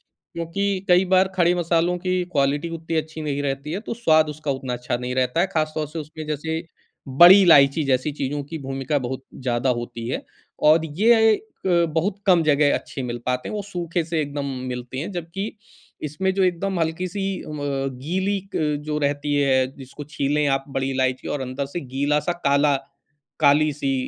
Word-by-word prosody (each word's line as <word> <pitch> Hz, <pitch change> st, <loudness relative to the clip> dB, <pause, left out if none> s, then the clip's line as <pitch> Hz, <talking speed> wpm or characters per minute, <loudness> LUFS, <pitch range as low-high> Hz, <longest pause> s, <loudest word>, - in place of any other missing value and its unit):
क्योंकि 190 Hz, +3 st, -3 dB
कई 180 Hz, +1 st, +5 dB
बार 185 Hz, +1 st, +5 dB
खड़े 175 Hz, -1 st, +4 dB
मसालों 170 Hz, +1 st, +1 dB
की 185 Hz, 0 st, -1 dB
क्वालिटी 145 Hz, +1 st, +1 dB
उतनी 165 Hz, 0 st, -5 dB
अच्छी 160 Hz, 0 st, -4 dB
नहीं 145 Hz, -2 st, -2 dB
रहती 140 Hz, +2 st, -3 dB
है, 185 Hz, -, -2 dB
तो 225 Hz, -, -5 dB
स्वाद 160 Hz, -9 st, +3 dB
उसका 150 Hz, -1 st, -3 dB
उतना 130 Hz, -2 st, -3 dB
अच्छा 120 Hz, 0 st, -2 dB
नहीं 125 Hz, +1 st, -4 dB
रहता 130 Hz, +4 st, +1 dB
है। 185 Hz, -, +2 dB
खास 155 Hz, -1 st, 0 dB
तौर 155 Hz, -2 st, -2 dB
से 160 Hz, +2 st, -6 dB
उसमें 155 Hz, +1 st, -8 dB
जैसे 160 Hz, +2 st, -3 dB, 0.4 s
बड़ी 175 Hz, +9 st, +8 dB
इलायची 150 Hz, -4 st, +6 dB
जैसी 135 Hz, +1 st, +1 dB
चीज़ों 145 Hz, 0 st, -3 dB
की 165 Hz, -, -4 dB
भूमिका 135 Hz, +1 st, -2 dB
बहुत 130 Hz, +1 st, -5 dB, 0.2 s
ज़्यादा 125 Hz, 0 st, 0 dB
होती 120 Hz, -1 st, -6 dB
है -, -, -3 dB, 0.5 s
और 160 Hz, +1 st, +4 dB
ये 225 Hz, 0 st, +5 dB, 0.3 s
अ, -, -, +1 dB, 0.2 s
बहुत 165 Hz, +5 st, -1 dB
कम 180 Hz, -4 st, +5 dB
जगह 145 Hz, -1 st, +3 dB
अच्छे 135 Hz, -, -6 dB
मिल 120 Hz, -1 st, -3 dB
पाते 125 Hz, 0 st, -1 dB
हैं। -, -, -6 dB
वो 210 Hz, -, -2 dB
सूखे 175 Hz, -3 st, -3 dB
से 165 Hz, 0 st, -2 dB
एकदम 145 Hz, -1 st, -4 dB, 0.2 s
मिलती 125 Hz, +1 st, -5 dB
है, 155 Hz, -, -3 dB
जबकि 175 Hz, +2 st, -4 dB, 0.6 s
इसमें 190 Hz, +6 st, -1 dB
जो 195 Hz, 0 st, +1 dB
एकदम 185 Hz, +1 st, 0 dB
हल्की-सी 180 Hz, +4 st, -2 dB, 0.2 s
अ, -, -, -11 dB
गीली 145 Hz, +7 st, -2 dB, 0.2 s
अ, -, -, +1 dB, 0.3 s
जो 150 Hz, 0 st, -2 dB
रहती 145 Hz, +1 st, 0 dB
है 135 Hz, -2 st, +3 dB
जिसको 135 Hz, +2 st, -9 dB
छीलें 145 Hz, +1 st, +1 dB
आप 135 Hz, -1 st, 0 dB
बड़ी 135 Hz, 0 st, -1 dB
इलायची 130 Hz, -1 st, -1 dB
और 145 Hz, -, -4 dB
अंदर 130 Hz, +2 st, -3 dB
से -, -, 0 dB, 0.2 s
गीला-सा 150 Hz, +4 st, +1 dB
काला 140 Hz, +1 st, +4 dB, 0.6 s
काली-सी 145 Hz, -1 st, +3 dB
150 Hz, 180 wpm, -23 LUFS, 135-175 Hz, 0.6 s, बड़ी